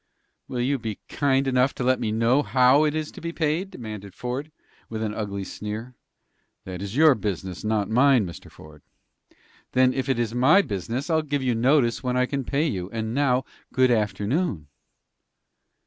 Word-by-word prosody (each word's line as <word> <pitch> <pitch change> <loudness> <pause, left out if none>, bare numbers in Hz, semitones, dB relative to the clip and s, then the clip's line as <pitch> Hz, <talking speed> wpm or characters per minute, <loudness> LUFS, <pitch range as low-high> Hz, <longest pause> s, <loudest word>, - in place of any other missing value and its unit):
"Will 125 -2 -3
you 135 +2 0
be 110 -3 -5
kind 135 -1 +1
enough 130 +1 +2
to - - -3
let 130 +1 +2
me 110 - -1
know 115 +5 +3
how 130 +2 +4
it 150 0 0
is 155 -1 -3
to - - -11
be 170 +1 -4
paid?" 165 +4 -1
demanded 105 - -8
Ford, 130 +5 -4 0.4
with 110 -1 -4
an 105 -1 -2
ugly 100 -2 -4
sneer. 110 +5 -6 0.7
"That 90 -1 -6
is 100 +2 -5
your 155 0 +7
business, 95 -5 -4
not 105 -2 0
mine, 125 -1 +4
Mr. 85 - -9
Ford." 75 -1 -15 0.9
"Then, 130 0 +4
if 135 0 -2
it 130 - +2
is 115 -2 -1
my 135 +11 +5
business, 115 - -3
I'll 160 0 +3
give 145 -2 -2
you 125 -2 +1
notice 120 0 +2
when 125 -1 -1
I 125 - +3
can 135 +1 -3
pay 140 +5 0
you. 95 - -3
And 110 +1 -3
now, 130 -1 +2 0.3
good 130 -1 +3
afternoon." 105 - -1
125 Hz, 180 wpm, -25 LUFS, 105-140 Hz, 0.9 s, your